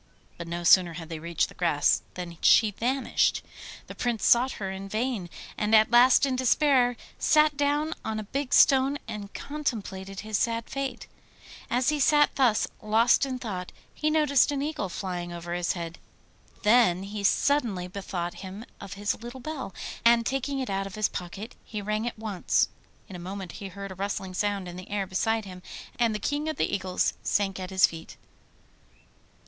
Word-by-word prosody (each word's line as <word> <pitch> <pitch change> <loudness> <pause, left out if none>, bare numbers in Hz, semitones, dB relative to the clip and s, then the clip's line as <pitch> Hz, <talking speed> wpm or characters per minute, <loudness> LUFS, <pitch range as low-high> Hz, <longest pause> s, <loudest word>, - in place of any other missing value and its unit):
But 170 - -8
no 170 +1 -4
sooner 175 -1 +6
had 165 -1 -8
they 165 -2 -5
reached 170 0 0
the - - -14
grass 165 -5 +2
than 175 -2 -7
she 220 -2 +6
vanished. 255 +6 0 0.4
The - - -9
Prince 235 -4 -2
sought 250 +2 +5
for - - -8
her 190 - -2
in 195 +1 -7
vain, 220 -4 -2 0.3
and 210 +1 +3
at 215 +2 +5
last 250 +3 +6
in 265 -2 -1
despair 255 -1 +3 0.2
sat 305 -1 +4
down 290 +2 +1
on 220 -1 -3
a - - -4
big 275 +5 -4
stone 270 +1 +5
and 210 -2 -6
contemplated 200 -10 -4
his 215 -1 -2
sad 230 -1 -1
fate. 275 -1 -4 0.6
As 245 +2 +2
he 300 -1 0
sat 295 +1 +4
thus 245 -6 +3
lost 225 +5 +3
in 260 -1 -3
thought, 190 -7 -5 0.2
he 305 - 0
noticed 300 -4 +3
an 280 -1 -1
eagle 295 -10 -3
flying 175 -1 -4
over 170 0 -6
his 175 0 0
head. 170 -2 -6 0.6
Then 210 -5 +4
he 205 +1 -6
suddenly 210 -5 +1
bethought 180 -2 -4
him 195 +4 -8
of 200 -1 -8
his 205 +2 -2
little 240 +2 -8
bell, 285 -5 -5 0.3
and 235 0 +5
taking 270 +2 -1
it 260 -3 -3
out 195 0 -1
of 195 - -9
his 215 -1 +1
pocket 195 +6 -7
he 215 - -6
rang 215 +2 -2
it 240 - -4
once. 215 -4 0 0.4
In 195 - -9
a - - -7
moment 185 0 -6
he 200 - -7
heard 195 +1 -8
a - - -5
rustling 190 0 -4
sound 200 0 -1
in 175 0 -8
the 185 - -10
air 205 -1 -1
beside 220 +4 0
him, 185 -1 -10 0.4
and 230 -2 +2
the - - 0
King 290 +8 -2
of 310 - -3
the - - -1
Eagles 185 -2 0
sank 195 -2 0
at 185 -1 -5
his 190 -1 +5
feet. 165 -1 -7
210 Hz, 185 wpm, -27 LUFS, 185-255 Hz, 0.6 s, sooner